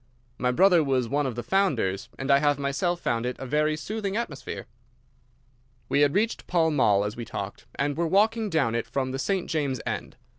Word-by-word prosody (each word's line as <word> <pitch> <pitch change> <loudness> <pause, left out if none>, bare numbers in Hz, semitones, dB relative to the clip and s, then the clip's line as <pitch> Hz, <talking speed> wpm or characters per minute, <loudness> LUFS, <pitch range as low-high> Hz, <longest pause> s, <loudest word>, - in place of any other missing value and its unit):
My 125 - +1
brother 180 +4 +5
was 130 -4 +1
one 145 +2 0
of 125 - -4
the 120 - -4
founders, 120 - 0
and 135 +1 -1
I 140 - +6
have 145 -1 +2
myself 140 +6 -1
found 115 0 0
it 125 +1 -3
a 135 - -6
very 150 +3 +1
soothing 205 +3 -3
atmosphere." 155 - -5 1.2
We 140 - +3
had 145 +2 +3
reached 220 +3 0
Pall 165 -2 +2
Mall 105 -8 +3
as 105 +2 -3
we 120 - -5
talked, 100 -2 -6
and 145 0 -1
were 170 +1 0
walking 215 +4 +2
down 150 -10 +1
it 115 0 -2
from 130 -1 -2
the 135 - -4
St. 190 +5 -1
James's 140 -6 -1
end. - - -4
145 Hz, 200 wpm, -26 LUFS, 125-175 Hz, 1.2 s, I